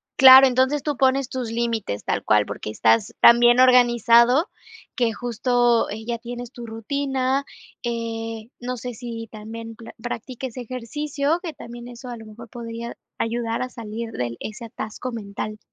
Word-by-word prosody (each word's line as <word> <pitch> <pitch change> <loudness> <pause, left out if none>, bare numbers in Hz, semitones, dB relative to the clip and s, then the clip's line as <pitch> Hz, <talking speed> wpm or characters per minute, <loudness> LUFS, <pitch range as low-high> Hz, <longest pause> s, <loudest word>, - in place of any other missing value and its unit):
Claro, 265 0 +10
entonces, 260 +3 +2
tú 290 -2 -2
pones 265 -1 +2
tus 250 -3 -4
límites 230 - -2
tal - - -1
cual, 105 -1 +3
porque, 105 - -5
estás 110 -1 +2
tan 235 0 +8
bien 240 +1 +5
organizado, 245 - +5 0.5
que 235 -2 +1
justo, 240 +1 +1
eh, 220 +1 -6
ya 235 - -1
tienes 240 +1 -7
tu 240 -1 -9
rutina, 265 +4 -1 0.4
eh, 225 -1 -4
no 250 +1 -4
sé, 245 0 -6
si 230 -2 -7
también 225 +1 -8
pla 230 0 -12
practiques 245 +1 -6
ejercicio, 280 +6 -2
que 330 - -5
también 240 -2 -10
eso 245 +1 -10
a 240 - -6
lo 225 - -11
mejor 220 +1 -12
podría 235 0 -7 0.2
ayudar 230 0 -1
a 255 - -2
salir 230 -1 -6
del 120 - -4
ese 230 +3 -7
atasco 225 +2 -6
mental. 215 -1 -6
235 Hz, 160 wpm, -23 LUFS, 225-255 Hz, 0.5 s, Claro